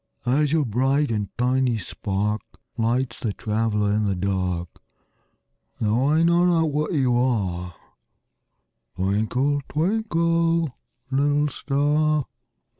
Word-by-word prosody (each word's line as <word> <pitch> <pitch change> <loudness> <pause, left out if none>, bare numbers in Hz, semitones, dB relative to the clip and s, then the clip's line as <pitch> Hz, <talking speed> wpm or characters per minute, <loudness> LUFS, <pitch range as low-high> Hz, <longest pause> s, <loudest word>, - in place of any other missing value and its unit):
As 140 +4 +2
your 155 -2 +2
bright 135 +5 +1
and 105 -3 -2
tiny 125 -1 +1
spark 105 +1 -2 0.3
Lights 120 +1 -1
the 110 -4 -2
traveler 105 -1 0
in 105 0 +1
the 100 -2 0
dark, 90 -2 -1 1.1
Though 115 +5 +1
I 155 +2 +3
know 170 +1 +4
not 165 -3 +2
what 150 +1 -1
you 130 -5 +2
are, 95 -9 -1 1.2
Twinkle, 110 +9 0
twinkle, 165 - +1 0.4
little 145 +2 +2
star. 145 +2 +1
130 Hz, 110 wpm, -23 LUFS, 105-150 Hz, 1.2 s, know